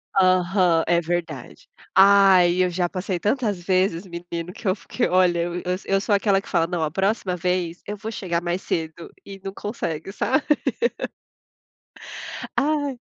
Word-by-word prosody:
Aham, 185 -2 +3
é 170 0 +3
verdade. 165 -5 -5 0.3
Ai, 190 -2 +6
eu 180 - +1
já 175 0 0
passei 185 0 -3
tantas 210 -1 0
vezes 185 -1 +1
menino, 170 0 -6
que 210 - -7
eu 185 - +3
fiquei 245 +3 -2
olha, 180 -2 +3
eu 175 +1 -2
eu 180 - -3 0.2
eu 195 0 +1
sou 210 - 0
aquela 200 -1 +3
que - - -17
fala: 165 - +2
"Não, 175 -2 -2
a 155 - -1
próxima 195 0 0
vez, 180 -1 -2
eu 210 - -4
vou 220 +2 -6
chegar 175 -6 -2
mais 175 +1 -2
cedo", 165 -1 -4
e 195 -1 -10
não 195 - -4
consegue, 190 -6 -4
sabe. 265 +8 0 2.1
Ai. 285 -3 0
185 Hz, 160 wpm, -23 LUFS, 175-200 Hz, 2.1 s, Ai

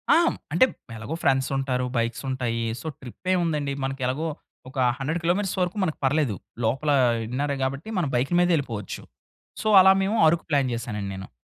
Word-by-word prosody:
ఆ! - - +6
హ్మ్. - - -1 0.2
అంటే, 175 - +6 0.3
ఎలగో 115 +9 -5
ఫ్రెండ్సుంటారు, 135 -1 +1
బైక్సుంటాయి. 115 0 -1 0.2
సో - - -7
ట్రిప్పేముందండి, 155 +1 -1
మనకెలగో 135 +3 -2 0.4
ఒక 135 - -12 0.2
100 150 +5 -2
కిలోమీటర్స్ 185 +3 0
వరకు 180 +3 -1
మనకు 160 -4 -1
పర్లేదు. 135 -6 +1 0.3
లోపలా 140 +6 +1 0.3
ఇన్నరే 140 +4 -1
గాబట్టి, 135 +9 -3
మనం 170 -6 0
బైకు 130 +7 0
మీదే 175 -1 +4
ఎళ్ళిపోవచ్చు. 115 -9 -5 0.6
సో, 215 - -1
అలా 190 +1 +7
మేము, 210 +4 0
అరకు 170 +1 0
ప్లాన్ 140 -3 +2
జేశానండి 105 -4 -4
నేను. 95 -1 -8
140 Hz, 150 wpm, -25 LUFS, 125-165 Hz, 0.6 s, అలా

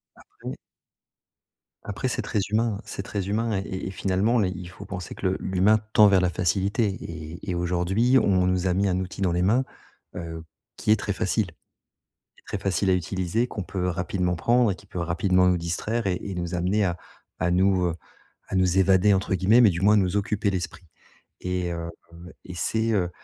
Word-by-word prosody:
Après - - -10 1.3
après, 100 +3 -3
c'est 125 - -1
très 105 - -1
humain, 110 0 +1
hein, 105 - -10
c'est 95 - -5
très 100 -2 -4
humain. 110 +1 0
Et - - -2
et 95 - -4
et - - -4
finalement 100 +5 +1
les 95 -4 +2
il 90 -1 -8
faut 95 +3 -11
penser 90 -4 -6
que 95 - -2
le 95 - 0
l'humain 95 +4 +3
tend 105 - +8
vers 95 -2 +4
la 90 - +2
facilité 95 +6 0
et 85 -1 -7
et - - -1
aujourd'hui, 90 +8 +2
on 95 -4 +2
nous 90 0 +1
a 90 - +2
mis 100 +2 +1
un 90 0 +1
outil 95 +1 -6
dans 90 -3 +2
les 90 - +1
mains, 115 +8 +3 0.5
heu, 80 -2 -6 0.3
qui - - 0
est - - +7
très 105 -1 -3
facile. 100 +2 0 1.0
Très 105 - -4
facile 95 0 0
à - - +5
utiliser, 95 +5 -1
qu'on 100 - -5
peut 90 0 -3
rapidement 90 0 -1
prendre 120 +5 +3
et - - -3
qui 100 - -18
peut 90 - -6
rapidement 90 +2 +2
nous 90 -1 +3
distraire 95 +7 -2
et 90 -2 0
et 100 -2 -5
nous 85 0 -4
amener 95 +5 +1
à 90 -1 -1 0.4
à 90 +1 +1
nous, 95 0 +3
heu, 85 - -2 0.5
à - - -3
nous 95 -1 +2
«évader» 95 +1 +5
entre 95 0 0
guillemets, 100 +7 +5
mais 115 - +7
du 85 - -3
moins 105 +2 +5
nous 95 0 +1
occuper 105 0 0
l'esprit. 90 -1 -4 0.6
Et 90 -1 -2
heu, 85 0 -4 0.2
heu, 85 +2 -12
et 90 - -8
c'est, 110 +5 0
heu, 90 -5 +1
95 Hz, 205 wpm, -25 LUFS, 90-100 Hz, 1.3 s, tend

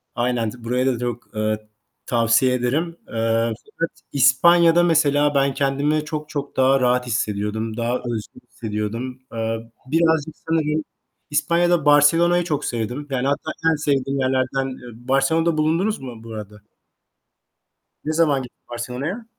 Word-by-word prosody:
Aynen, 120 -2 0
t 120 +1 -12
burayı 125 +2 0
da 125 -3 +1
çok, 120 -2 -5
eee, 110 0 -1 0.4
tavsiye 120 +2 +3
ederim. 150 +8 -1
Eee, 115 0 0 0.2
fakat 165 - -2 0.2
İspanya'da, 170 +6 +5
mesela, 145 -3 +3
ben 140 0 +2
kendimi 145 +2 0
çok, 150 0 -5
çok 145 -2 -5
daha 130 +1 +4
rahat 125 0 +2
hissediyordum, 110 0 -2
daha 120 +1 0
özgür 115 -4 -6
hissediyordum. 115 +4 -4
Eee, 115 0 -3
birazcık 160 +1 +1
sanırım 155 -1 +1 0.5
İspanya'da 170 +2 +2
Barcelona'yı 165 +4 +5
çok 150 -4 -2
sevdim. 120 +5 -3
Yani, 130 0 -1
hatta 145 +2 -1 0.2
en - - +2
sevdiğim 140 -2 0
yerlerden, 130 0 0
eee 120 -2 -10
Barcelona'da 155 +5 +2
bulundunuz 165 +8 +1
mu 120 -4 -9
bu 115 -1 -9
arada? 105 -1 -8 1.4
Ne 155 - -1
zaman 155 -4 +2
gittin 125 - -15
Barcelona'ya? 125 - -4
135 Hz, 135 wpm, -22 LUFS, 120-155 Hz, 1.4 s, İspanya'da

